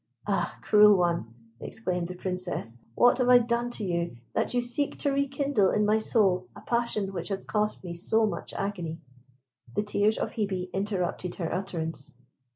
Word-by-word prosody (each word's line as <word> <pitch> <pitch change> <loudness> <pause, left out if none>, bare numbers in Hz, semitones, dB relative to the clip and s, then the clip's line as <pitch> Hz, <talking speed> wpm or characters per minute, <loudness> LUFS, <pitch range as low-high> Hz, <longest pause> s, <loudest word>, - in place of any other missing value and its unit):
"Ah, - - -1
cruel 210 -1 +7
one!" 170 -10 0 0.3
exclaimed 180 -6 -3
the 180 - -7
Princess. 180 -10 -3 0.2
"What 245 +1 +5
have 250 -1 +2
I 250 - +9
done 240 0 0
to - - -5
you 170 -7 -2 0.2
that - - 0
you - - +4
seek 245 +4 0
to 285 - +1
rekindle 275 -6 +1
in 210 0 +2
my 215 +1 +3
soul 200 -5 +2
a - - -11
passion 235 -5 -1
which 175 -2 -4
has 195 -1 -2
cost 210 -2 -1
me 175 -2 -5
so 220 +6 +3
much 210 - -4
agony?" 175 -5 -3 0.8
The 210 - +1
tears 210 +1 +1
of - - -2
Hebe 190 -4 -2
interrupted 190 -2 -2
her 165 -3 -3
utterance. 165 -6 -3
200 Hz, 170 wpm, -28 LUFS, 180-225 Hz, 0.8 s, I